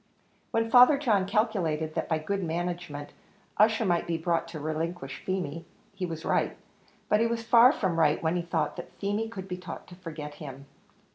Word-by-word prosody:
When 225 0 0
Father 250 +4 +8
John 210 -9 +2
calculated 185 -8 0
that - - -2
by 160 - +2
good 195 +5 -2
management 170 -3 -4 0.5
Ussher 220 +1 +4
might 175 -2 +1
be 170 -1 0
brought 170 0 0
to 165 -2 -7
relinquish 155 -1 -4
Feemy, 170 -4 -3 0.3
he 190 -2 -3
was 165 -1 -6
right, - - +1 0.5
but 210 - +3
he 230 - +3
was 230 0 -2
far 235 +2 +7
from 180 -9 -1
right, 155 -1 +4
when 160 +2 +1
he 175 - +1
thought 165 -3 -2
that - - -8
Feemy 205 +3 -2
could 195 -4 -7
be 180 -1 -4
taught 180 0 -8
to 180 - -11
forget 155 -5 -7
him. 140 -2 -8
175 Hz, 190 wpm, -28 LUFS, 160-210 Hz, 0.5 s, Father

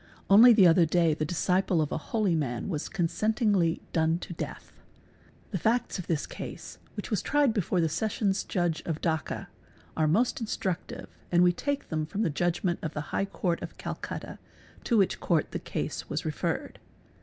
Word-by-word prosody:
Only 230 +5 +9
thi 210 -5 +7
other 170 0 +6
day 165 0 +3
the 155 0 -2
disciple 180 +2 +1
of 155 -2 0
a - - -1
holy 215 -6 +1
man 140 -2 -2
was 155 -5 -3
consentingly 195 -1 +1
done 160 0 +2
to 175 - -7
death - - -7 0.8
The 190 - -2
facts 225 +4 0
of 180 - -6
this 160 -3 0
case, - - -8 0.2
which - - -6
was 210 - +1
tried 290 -5 +2
before 190 -3 0
the 165 - +3
Sessions 200 +3 0
Judge 175 -4 -1
o 165 - +1
Dacca, 160 -2 -2 0.5
are 155 -1 +2
most 230 +11 +2
instructive 190 -5 -3 0.2
and 175 0 +5
we 175 0 +5
take 285 +9 -3
them 155 -1 -2
from 205 +6 -2
the 165 - +1
judgment 175 +3 0
of 160 - -5
t - - -1
High 150 +6 -2
Court 180 -3 -2
of - - -8
Calcutta - - -6 0.5
to 235 - +2
which 195 -3 +2
Court 160 -3 +1
the - - -3
case - - -4
was - - -3
referred. - - -3
175 Hz, 180 wpm, -28 LUFS, 160-210 Hz, 0.8 s, Only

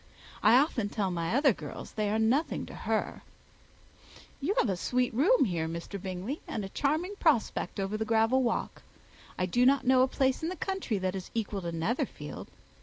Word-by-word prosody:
I 240 - +6
often 255 -7 +1
tell 200 -3 -1
my 170 +3 -1
other 275 -2 +4
girls 150 -5 -8
they 210 -1 -1
are 215 - +1
nothing 240 +8 +1
to - - -11
her. - - -2 1.2
You 345 +9 -1
have - - +3
a 190 - +1
sweet 250 +7 0
room 315 - +4
here, 170 -6 -1
Mr. 170 +4 -6
Bingley, 190 - -4
and 210 -3 -3
a - - -7
charming 315 - -1
prospect 280 -8 +1
over 195 +2 -1
that 220 - -2
gravel 225 +3 +3
walk. 240 - -2 0.6
I 185 - +1
do 240 +7 +2
not 270 +2 +4
know 255 0 +5
a 260 - +5
place 265 0 0
in 320 - -1
the 370 - -4
country 380 - -2
that 185 -1 -1
is 190 -2 -6
equal 210 -3 -2
to 170 -1 -4
Netherfield. 165 +10 -3
225 Hz, 190 wpm, -29 LUFS, 195-270 Hz, 1.2 s, I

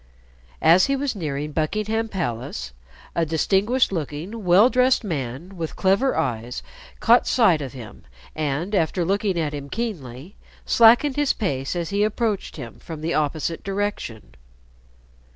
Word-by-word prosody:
As 175 +7 +6
he 275 - +1
was 275 -2 -2
nearing 150 -4 -3
Buckingham 215 +9 -1
Palace, 120 - -4 0.4
a 170 - +1
distinguished 195 - +2
looking 170 +6 -5
well 185 +5 +6
dressed 255 0 +3
man 155 - -5
with 165 -2 -4
clever 200 +8 +2
eyes 120 0 -2 0.4
caught 235 +2 +4
sight 185 -11 +4
of 135 -2 -6
him, 120 -5 -11 0.3
and, 155 +6 -2
after 175 -1 +1
looking 195 -1 0
at 150 -2 -1
him 140 -1 -6
keenly, 170 - -5 0.3
slackened 240 +5 +5
his 290 -2 +2
pace 135 - -2
as 170 0 -3
he 200 +1 +2
approached 215 -1 -1
him 120 -6 -9
from 160 -2 -8
the 165 +2 -1
opposite 155 +2 -1
direction. 195 - -4
175 Hz, 140 wpm, -23 LUFS, 145-215 Hz, 0.4 s, As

